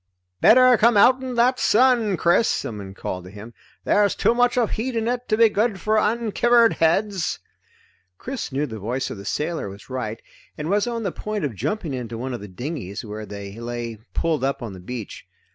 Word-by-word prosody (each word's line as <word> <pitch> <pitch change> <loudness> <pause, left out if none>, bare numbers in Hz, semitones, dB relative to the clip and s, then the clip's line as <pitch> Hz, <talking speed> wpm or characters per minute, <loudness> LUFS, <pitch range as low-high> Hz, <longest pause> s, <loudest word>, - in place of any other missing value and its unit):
"Better 255 +1 +7
come 230 0 +5
outen 255 +3 +4
that 250 +2 +3
sun, 230 -4 +3
Chris!" 175 +8 +3
someone 100 -3 -4
called 90 -2 -5
to - - -10
him. 105 +4 -11 0.3
"There's 205 -1 +2
too - - +2
much 245 +1 +2
of 235 -3 +2
heat 245 +3 -3
in 225 0 -1
it 245 +1 -2
to 215 - +2
be 230 0 +7
good 210 -1 0
for 215 +2 +2
unkivered 230 +2 +3
heads!" 190 +2 +1 0.8
Chris 260 - -5
knew 140 +3 -1
the 110 -6 -7
voice 120 +6 -3
of - - -6
the 100 - -10
sailor 150 0 -2
was 100 +6 -12
right, 115 -4 -4 0.4
and 150 +4 -3
was 205 +2 +2
on 230 -1 -3
the 195 - -1
point 210 -4 -4
of 135 - -3
jumping 150 - -3
into 120 -3 -5
one 130 +2 -4
of 120 - -5
the 105 - -8
dinghies, 115 - -6
where 105 0 -7
they 100 +1 -8
lay 120 -2 -5 0.2
pulled 160 -4 0
up 135 -1 -1
on 110 -4 -6
the 95 - -10
beach. 110 +3 -8
165 Hz, 200 wpm, -23 LUFS, -, 0.8 s, Better